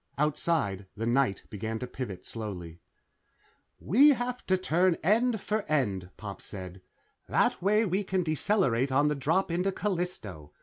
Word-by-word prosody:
Outside, 145 - 0
the 115 - -2
night 120 -4 +1
began 110 +2 -3
to 125 - -4
pivot 120 -7 -6
slowly. 90 -7 -6 1.0
"We 275 - +6
have 250 0 -3
to 185 - +3
turn 180 -1 +2
end 220 +5 +3
for 215 +2 -1
end," 100 -12 0
Pop 100 -2 -7
said. 95 -2 -8 0.5
"That - - +2
way 210 +4 +3
we 195 +1 0
can 190 -1 0
decelerate 155 - +1
on 145 +3 +3
the 150 - 0
drop 165 +7 +1
into 180 +3 +1
Callisto. 170 - -4
150 Hz, 145 wpm, -29 LUFS, -, 1.0 s, We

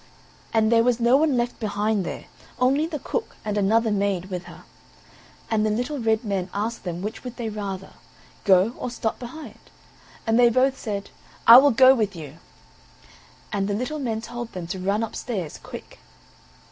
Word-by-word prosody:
And 220 0 +2
there 230 -1 +5
was 245 -1 +2
no 240 +2 +4
one 290 -2 +3
left 240 0 -2
behind 210 -1 0
there - - -6 0.3
only 275 +5 +2
the 320 -2 -4
cook 450 +10 -4
and 210 -1 -2
another 220 +3 +2
maid 195 -2 -1
with 180 -1 -4
her; 175 - -12 0.9
and 215 -1 +2
the 215 - +2
little 250 +7 -2
red 225 0 +1
men 195 -4 -2
asked 220 +2 -3
them 175 0 -4
which 210 +2 -5
would 250 -1 -7
they 230 -2 -3
rather 200 -3 -5 0.5
go, 195 +3 +4
or - - -3
stop 230 -2 -3
behind? 245 -2 -9 0.7
and 225 +1 +2
they 240 -1 +7
both 260 +3 +2
said: 205 -6 -5 0.3
"I 230 +1 +11
will 280 +2 +7
go 260 +1 +7
with 215 -6 -1
you;" 155 -1 -9 1.1
and 195 -1 0
the 205 - -1
little 255 +7 -3
men 225 -5 -2
told 240 0 -7
them 180 -3 -5
to 190 - -7
run 200 +4 0
upstairs 210 -6 -5
quick. - - -10
220 Hz, 180 wpm, -24 LUFS, 200-245 Hz, 1.1 s, I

